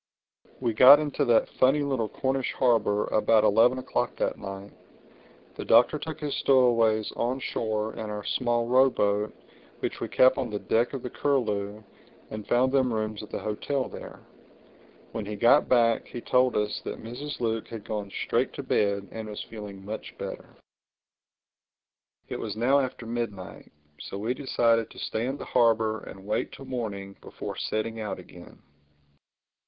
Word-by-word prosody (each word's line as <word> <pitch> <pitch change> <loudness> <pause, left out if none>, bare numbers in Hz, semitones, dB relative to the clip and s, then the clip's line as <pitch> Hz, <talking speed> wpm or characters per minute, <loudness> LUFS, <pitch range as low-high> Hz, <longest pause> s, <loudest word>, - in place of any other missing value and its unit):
We 120 -3 0
got 130 +6 +9
into 145 -1 -1
that 120 -3 +4
funny 135 +3 +2
little 130 -6 -1
Cornish 130 +3 -1
harbor 110 -5 +2
about 110 0 +3
eleven 115 +5 +4
o'clock 130 - -2
that - - -1
night. 95 0 -8 0.8
The - - -6
Doctor 120 +6 +4
took 155 0 -6
his 150 -2 -3
stowaways 115 -5 +3
on 125 +3 -1
shore 110 -3 -2
in 110 -1 -6
our 105 -1 -5
small 120 0 0
row 130 +2 +5
boat 105 -2 0 0.5
which - - -4
we - - -3
kept 130 +1 +4
on 130 -3 -2
the 105 - -3
deck 115 +5 0
of 135 - -5
the 125 - -5
Curlew 105 -7 -1 0.5
and 110 -1 -7
found 130 +2 +3
them 130 -2 +2
rooms 110 -1 -2
at 105 - -10
the - - -4
hotel 130 +5 -2
there. - - -10 0.9
When 110 - -4
he 105 - -4
got 120 +7 +4
back 115 -2 +3
he 120 - -7
told 125 +1 +2
us 105 0 -1
that - - -6
Mrs. 140 +6 -6
Luke 115 -2 -1
had 115 -3 -8
gone 105 -2 -4
straight - - 0
to - - -6
bed 100 -1 0
and 110 -1 -6
was 105 - -6
feeling 100 -3 -9
much 110 +2 -7
better. - - -7 1.7
It - - -5
was 105 -2 -4
now 130 +5 +4
after 130 -3 -3
midnight; 115 -5 -5 0.3
so - - -7
we 110 +5 -1
decided 115 -4 +1
to - - -16
stay 115 +3 -2
in 135 +2 -3
the - - -7
harbor 110 -2 +2
and 95 0 -11
wait 105 - -1
till 135 - -10
morning 100 -6 -5
before - - -7
setting 110 +1 -3
out 105 - -4
again. - - -14
115 Hz, 170 wpm, -27 LUFS, 105-130 Hz, 1.7 s, got